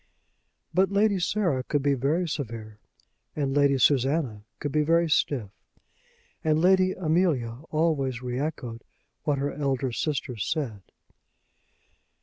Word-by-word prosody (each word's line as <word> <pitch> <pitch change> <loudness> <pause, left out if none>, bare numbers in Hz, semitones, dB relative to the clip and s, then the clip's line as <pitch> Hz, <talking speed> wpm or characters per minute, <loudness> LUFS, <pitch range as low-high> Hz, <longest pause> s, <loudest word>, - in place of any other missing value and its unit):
But 190 0 +3
Lady 200 -1 +3
Sarah 175 -7 +1
could 140 +2 -1
be 140 0 +3
very 145 +7 0
severe; 115 -8 -5 0.6
and 140 -2 -1
Lady 140 -1 +4
Susanna 130 -4 +2
could 145 - -4
be 150 - +2
very 165 +2 +3
stiff; 130 -8 0 0.9
and 155 -1 +2
Lady 185 +2 +4
Amelia 155 -9 0
always 150 -6 0
re 125 0 -3
echoed 125 -6 -4 0.4
what 145 -2 +1
her 140 +1 -2
elder 135 -3 -1
sisters 125 -5 -2
said. 135 -9 -2
145 Hz, 125 wpm, -26 LUFS, 125-160 Hz, 0.9 s, Lady